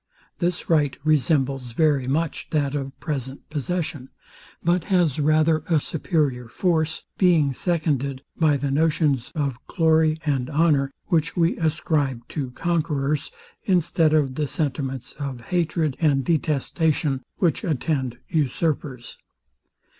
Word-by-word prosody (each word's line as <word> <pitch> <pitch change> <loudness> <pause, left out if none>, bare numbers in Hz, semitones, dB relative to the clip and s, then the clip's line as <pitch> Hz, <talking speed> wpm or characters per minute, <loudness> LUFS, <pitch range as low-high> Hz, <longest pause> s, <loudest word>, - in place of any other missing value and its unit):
This 175 0 -1
right 150 -4 +2
resembles 135 -4 +1
very 145 -2 +2
much 155 +4 -1
that 145 -3 0
of 135 -2 -4
present 135 -4 -4
possession; 150 -3 -3 0.5
but 175 0 +2
has 175 -8 +2
rather 155 +1 +3
a 160 -3 +4
superior 145 - -1
force, 160 +3 0 0.2
being 165 -7 +4
seconded 140 -5 -1
by 155 -3 +3
the 140 0 -2
notions 150 -4 +1
of 140 -5 -2
glory 160 -2 +3
and 135 -4 0
honour, 145 -3 +2 0.2
which 165 -3 +1
we 170 0 +3
ascribe 150 -6 0
to 140 -4 -3
conquerors, 150 -1 -1 0.3
instead 170 -4 +2
of 140 -4 +2
the 150 +2 -1
sentiments 135 -3 -3
of 135 -4 -4
hatred 160 0 0
and 140 -5 +2
detestation, 155 -2 0 0.2
which 170 -6 +1
attend 135 -5 -1
usurpers. 145 -3 -2
150 Hz, 120 wpm, -24 LUFS, 135-160 Hz, 0.5 s, a